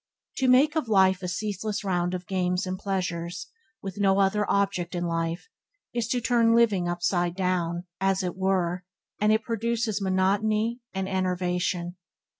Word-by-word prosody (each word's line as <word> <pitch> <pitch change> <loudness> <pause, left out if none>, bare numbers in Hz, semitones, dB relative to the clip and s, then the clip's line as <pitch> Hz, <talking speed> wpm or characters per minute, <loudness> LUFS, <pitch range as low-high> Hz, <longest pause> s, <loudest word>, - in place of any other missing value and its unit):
To 265 - +1
make 275 +5 +5
of 315 -7 0
life 190 -2 +4
a 180 - -3
ceaseless 210 +2 -3
round 180 -2 0
of 180 0 -6
games 180 -2 0
and 185 0 -3
pleasures, 180 -3 -3 0.3
with 195 +1 -6
no 195 -1 +3
other 200 +1 +2
object 195 -3 0
in 175 0 -1
life, 165 0 -2 0.5
is 235 -2 -1
to 245 +1 0
turn 230 -1 +3
living 205 -7 +3
upside 175 0 0
down, 180 -2 -1 0.2
as 195 0 +1
it 180 -1 -3
were, 185 -2 0 0.4
and 210 +1 +3
it 220 0 +2
produces 230 -2 -1
monotony 210 +5 +1
and 190 0 -3
enervation. 180 -1 -1
190 Hz, 155 wpm, -26 LUFS, 180-215 Hz, 0.5 s, make